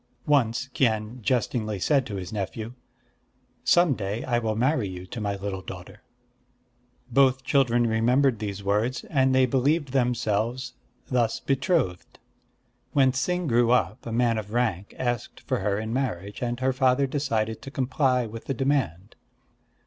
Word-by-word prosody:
Once 130 -4 +2
Kien 115 -1 0
jestingly 110 -2 0
said 135 +7 +2
to 105 - -5
his 95 +1 -6
nephew: 110 +3 -4 0.9
"Some 175 -4 +4
day 105 0 -3
I 120 -2 +1
will 110 -2 -1
marry 125 -1 +1
you 90 0 -7
to 110 +4 -7
my 100 -1 -1
little 95 -1 -4
daughter." 95 +4 -10 1.1
Both 130 +1 +4
children 120 -3 +3
remembered 120 +2 +2
these 100 -2 -4
words; 105 +6 0
and 130 -3 +3
they 130 0 +5
believed 140 +3 +1
themselves 125 -1 0 0.3
thus 120 -3 0
betrothed. 135 - -1 0.8
When 135 -2 +4
Ts'ing 175 +8 -1
grew 120 -4 +3
up, 110 -5 +1
a - - -4
man 115 -1 +2
of 105 0 -8
rank 110 -6 -1
asked 120 -2 -3
for - - -2
her 100 0 0
in 110 +1 -3
marriage; 105 -7 -3
and 120 0 -2
her 130 0 +2
father 130 +1 +3
decided 115 -6 -1
to 135 - -8
comply 130 -1 +1
with 115 +1 -8
the 135 - -2
demand. 115 - -1
120 Hz, 150 wpm, -26 LUFS, 105-130 Hz, 1.1 s, they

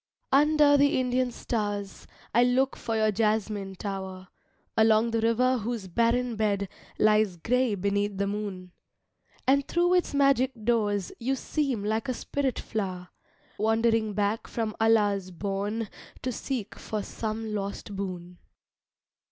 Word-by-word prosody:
Under 295 +1 +5
the 285 -1 +3
Indian 255 0 +1
stars 205 -4 -3 0.3
I 240 +3 +5
look 255 +2 +2
for 225 - -3
your 215 -1 +3
Jasmine 210 -2 0
Tower, 190 -1 -6 0.5
Along 220 +1 +4
the 225 0 0
River 250 +3 +2
whose 225 -2 -4
barren 235 +5 +1
bed 200 -2 0 0.3
Lies 215 -3 +3
gray 245 +5 +1
beneath 200 +1 -1
the 200 - +1
moon. 200 -3 -4 0.7
And 275 +1 +3
thro 350 +1 +2
its 360 -5 +1
magic 275 -2 +3
doors 210 -4 +1
You 260 +3 0
seem 270 -5 -1
like 220 +5 -1
a 255 - 0
spirit 270 -1 -2
flower, 185 -4 -4 0.5
Wandering 225 0 +2
back 205 +2 0
from 220 -2 -3
Allah's 205 -4 +3
bourne 200 +4 -3 0.4
To 255 - -1
seek 240 -3 -4
for 215 -2 -3
some 220 0 -4
lost 200 0 -4
boon. 180 -2 -6
220 Hz, 135 wpm, -27 LUFS, 200-245 Hz, 0.7 s, Under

